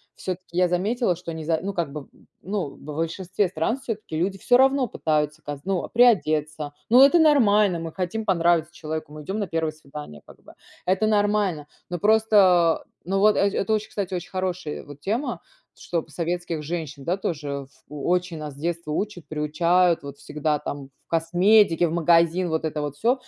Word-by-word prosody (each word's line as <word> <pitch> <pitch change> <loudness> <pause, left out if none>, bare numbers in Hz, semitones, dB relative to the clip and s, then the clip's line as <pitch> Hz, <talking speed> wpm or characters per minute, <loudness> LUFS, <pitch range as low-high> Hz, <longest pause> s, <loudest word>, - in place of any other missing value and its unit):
всё-таки 185 -1 -6
я 180 0 +4
заметила, 195 +3 0
что 170 -1 -7
низа 160 0 -1
ну, 200 +1 -3
как 170 -6 -2
бы 150 +1 -6
б - - -21
б - - -23 0.3
ну, 195 -5 -2
в - - -19
большинстве 165 +6 -2
стран 175 +8 -1
всё-таки 220 -10 -6
люди 190 +4 -1
всё 245 - +3
равно 270 0 +3
пытаются 155 -4 -1
каз 145 -1 -6
ну, 190 -2 -1
приодеться. 155 -11 +2 0.2
Но 250 +4 +8
это 310 +5 +5
нормально, 210 - +4
мы 165 0 -5
хотим 185 +5 -3
понравиться 170 -3 +2
человеку, 155 -2 -6
мы 150 0 -9
идём 195 +8 -3
на 200 - -2
1 160 -1 -1
свидание, 145 - -10
как - - -15
бы. - - -15 0.3
Это 190 +4 +2
нормально! 205 -7 +1 0.2
Ну 175 -1 -3
просто, 200 -5 +4 0.2
ну 195 +2 0
вот 210 +1 +5
э - - +1
это 200 +1 -1
очень, 215 0 -1
кстати, 195 -2 -4
очень 175 - -5
хорошие 185 -4 -3
вот 145 0 -12
тема, 225 - -2 0.4
чтоб 170 -2 -3
советских 175 -1 -3
женщин, 150 -3 -5
да, 180 +3 0
тоже, 160 -6 -4
э, 140 0 -3
ф 135 - -18 0.2
О 150 -1 -7
очень 180 -1 0
нас 150 -2 -6
с - - -17
детства 170 0 -3
учат, 175 -1 -3
приучают, 170 +3 +2
вот 140 0 -8
всегда 150 0 -2
там 140 -2 -6
к - - -45 0.3
косметике, 175 +1 +4
в - - -4
магазин, 170 +1 +3
вот 160 0 -1
это 150 -1 -2
вот 145 -1 -4
всё. 235 +10 +3
175 Hz, 195 wpm, -24 LUFS, 155-200 Hz, 0.4 s, Но